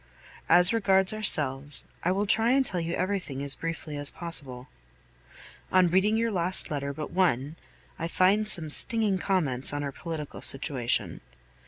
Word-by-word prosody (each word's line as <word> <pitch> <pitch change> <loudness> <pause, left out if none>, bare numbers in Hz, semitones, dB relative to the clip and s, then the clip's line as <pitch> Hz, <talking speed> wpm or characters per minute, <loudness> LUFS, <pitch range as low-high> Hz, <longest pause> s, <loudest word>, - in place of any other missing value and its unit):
As 180 +4 +5
regards 195 -3 +1
ourselves, 145 -9 +3 0.2
I 180 - 0
will 200 +2 -1
try 225 +3 +3
and 270 0 +1
tell 185 -7 0
you 165 +1 -4
everything 185 -8 -4
as 140 -1 -1
briefly 165 -2 -7
as 145 -1 +4
possible. 140 -7 -5 1.0
On 185 -2 +3
reading 195 +5 +1
your 230 0 -1
last 180 -2 +1
letter 140 -1 -4
but 150 +1 -8
one, 155 -5 -1 0.4
I 165 - -3
find 195 +5 +1
some 165 -7 +2
stinging 215 +1 +4
comments 150 -11 0
on 145 0 -4
our 140 - -5
political 155 0 -8
situation. 135 -3 -2
170 Hz, 155 wpm, -26 LUFS, 145-195 Hz, 1.0 s, As